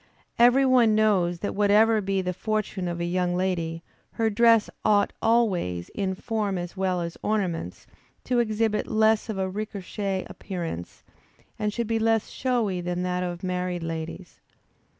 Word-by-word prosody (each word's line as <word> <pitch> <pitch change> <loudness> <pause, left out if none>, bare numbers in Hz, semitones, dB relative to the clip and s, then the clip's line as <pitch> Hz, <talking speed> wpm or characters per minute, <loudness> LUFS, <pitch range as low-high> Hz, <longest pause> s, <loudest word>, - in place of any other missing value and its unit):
Every 245 +3 +6
one 245 -4 +4
knows 185 -6 +2
that 205 - -2
whatever 210 +2 +4
be 195 -1 -1
the 180 0 -2
fortune 210 -2 -2
of 170 0 -3
a 170 - -1
young 175 0 0
lady, 170 -3 -2 0.3
her 225 -1 0
dress 230 0 +5 0.2
ought 205 -1 +3
always, 185 - +1
in 190 -2 -2
form 210 -1 -2
as 175 +1 -5
well 185 -2 0
as 170 0 -5
ornaments, 185 - -2 0.4
to 245 -1 +1
exhibit 220 -1 0
less 220 +1 +2
of 215 - -3
a 190 0 0
recherché 195 -1 -4
appearance 170 - -6 0.6
and 210 0 0
should 235 +2 -2
be 225 +1 0
less 225 -1 +1
showy 230 -8 -1
than 180 +1 -2
that 180 0 -1
of 175 0 -4
married 180 -1 -2
ladies. 165 +2 -6
195 Hz, 155 wpm, -26 LUFS, 180-220 Hz, 0.6 s, Every